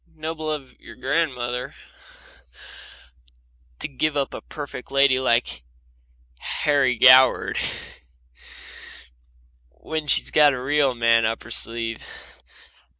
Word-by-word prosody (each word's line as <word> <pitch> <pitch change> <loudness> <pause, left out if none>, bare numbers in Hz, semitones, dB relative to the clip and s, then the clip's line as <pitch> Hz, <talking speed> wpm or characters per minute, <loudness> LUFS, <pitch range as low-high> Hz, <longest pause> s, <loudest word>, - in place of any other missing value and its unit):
Noble, 155 -2 -4 0.2
your - - -14
grandmother 125 -3 -3 2.0
to - - -3
give 145 +2 -2
up 140 -1 -2
a - - -7
perfect 140 -4 -9
lady 135 -1 +3
like 120 - 0 0.8
Harry 140 -4 0
Goward, 130 +2 +5 2.1
when 155 - -6
she's - - +3
got 150 -2 +4
a 130 - -5
real 135 0 0
man 115 -1 +3
up 110 +1 -2
her 120 - -12
sleeve! 115 -1 0
130 Hz, 95 wpm, -22 LUFS, 120-150 Hz, 2.1 s, Goward